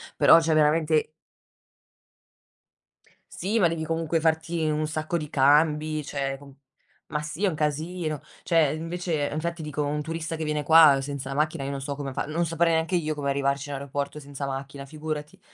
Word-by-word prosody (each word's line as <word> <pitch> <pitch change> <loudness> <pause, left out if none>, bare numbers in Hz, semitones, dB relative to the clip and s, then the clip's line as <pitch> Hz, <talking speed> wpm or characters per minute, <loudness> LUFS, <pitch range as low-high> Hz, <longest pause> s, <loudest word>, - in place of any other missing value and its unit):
però 165 - +7
cioè 160 -1 +1
veramente 155 0 +3 2.2
Sì, 205 +6 -1
ma 180 - +5
devi 165 -1 -3
comunque 165 0 0
farti 160 0 0
un 155 0 0
sacco 155 +2 -2
di 150 -3 -5
cambi, 150 +2 +3
cioè, 135 -1 -3
co 140 -1 -15 0.5
ma 150 - -2
sì, 155 +5 -6
è - - +4
un 175 - -1
casino. 155 +1 -2 0.2
Cioè, 165 -3 +3
invece 165 -1 -2
infatti, 170 +2 -3
dico, 150 -1 -3
un 150 +1 -1
turista 165 +1 -4
che 160 - -4
viene 150 -1 -1
qua 155 -2 +7
senza 135 -1 -5
la 135 - -4
macchina, 155 0 0
io 135 - -3
non 140 -1 -4
so 140 +1 -4
come 140 -2 -5
fa. - - -2
Non 160 +3 -1
saprei 165 +1 +1
neanche 160 +3 +1
io 155 -3 0
come 140 -1 -2
arrivarci 140 +1 -1
in 145 - -3
aeroporto 140 +2 -4
senza 140 -1 -6
macchina, 135 +1 -6
figurati. 150 0 -6
155 Hz, 180 wpm, -26 LUFS, 145-160 Hz, 2.2 s, però